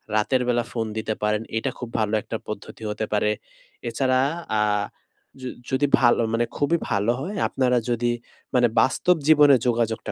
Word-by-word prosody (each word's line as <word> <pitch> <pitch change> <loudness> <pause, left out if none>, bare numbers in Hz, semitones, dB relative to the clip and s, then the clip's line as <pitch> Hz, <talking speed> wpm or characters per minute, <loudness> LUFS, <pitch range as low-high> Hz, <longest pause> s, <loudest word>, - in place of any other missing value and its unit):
রাতের 125 +5 +2
বেলা 120 -1 +2
ফোন 115 -2 -2
দিতে 110 0 -1
পারেন। 105 0 +1 0.2
এটা 115 - -1
খুব 120 -2 -6
ভালো 110 -1 0
একটা 110 - -5
পদ্ধতি 105 +1 -7
হতে 105 +1 -2
পারে। 105 0 +2 0.6
এছাড়া 130 +1 +1 0.4
আ - - +3 0.8
য - - -11 0.3
যদি 140 +2 +2
ভালো 120 -1 +4
মানে 120 +1 +2
খুবই 160 +4 +2
ভালো 105 +3 +2
হয় 195 +6 -5
আপনারা 125 -2 +1
যদি 120 0 +1 0.4
মানে 125 -1 +5
বাস্তব 175 +8 +2
জীবনে 145 -3 +7
যোগাযোগটা 115 -2 0
120 Hz, 160 wpm, -24 LUFS, 110-130 Hz, 0.8 s, জীবনে